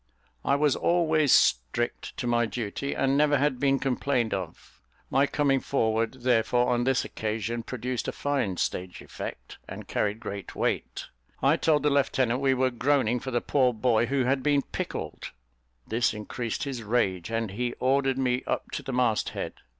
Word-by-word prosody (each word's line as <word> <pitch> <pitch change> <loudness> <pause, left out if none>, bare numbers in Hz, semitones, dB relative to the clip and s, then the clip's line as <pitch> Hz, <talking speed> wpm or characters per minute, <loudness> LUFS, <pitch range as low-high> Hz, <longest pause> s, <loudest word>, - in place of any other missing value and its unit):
I 140 - +2
was 145 -2 +2
always 160 -5 +2
strict 70 - +2
to - - -3
my 120 -1 +2
duty, 115 +5 -4
and 135 0 +1
never 145 0 +4
had 140 -2 +1
been 135 0 +3
complained 130 -3 0
of; 90 -9 -7 0.3
my 140 +1 +3
coming 140 -2 +2
forward, 115 -1 0
therefore, 125 0 +2
on 120 0 0
this 135 0 +2
occasion, 110 +2 -3
produced 125 0 -4
a - - 0
fine 135 -10 -1
stage 90 +1 -3
effect, - - -8
and - - -8
carried 105 +1 -1
great 100 -3 -7
weight. - - -2 0.4
I 140 +3 +5
told 155 -3 +2
the 150 - +3
lieutenant 130 -3 +2
we 135 -1 +2
were 130 0 +1
groaning 125 -1 +1
for 130 - -6
the 120 -2 0
poor 130 -3 +2
boy 120 0 +2
who 135 -1 +1
had 130 +2 +1
been 145 0 +2
pickled. - - -5 0.5
This 115 0 0
increased 110 +2 -4
his 135 -4 -4
rage, 105 -5 0
and 115 -3 -2
he 120 +4 -2
ordered 135 0 +2
me 125 -1 +1
up - - -2
to - - -3
the - - -6
mast 125 -3 +1
head. - - -3
125 Hz, 175 wpm, -27 LUFS, 115-140 Hz, 0.5 s, I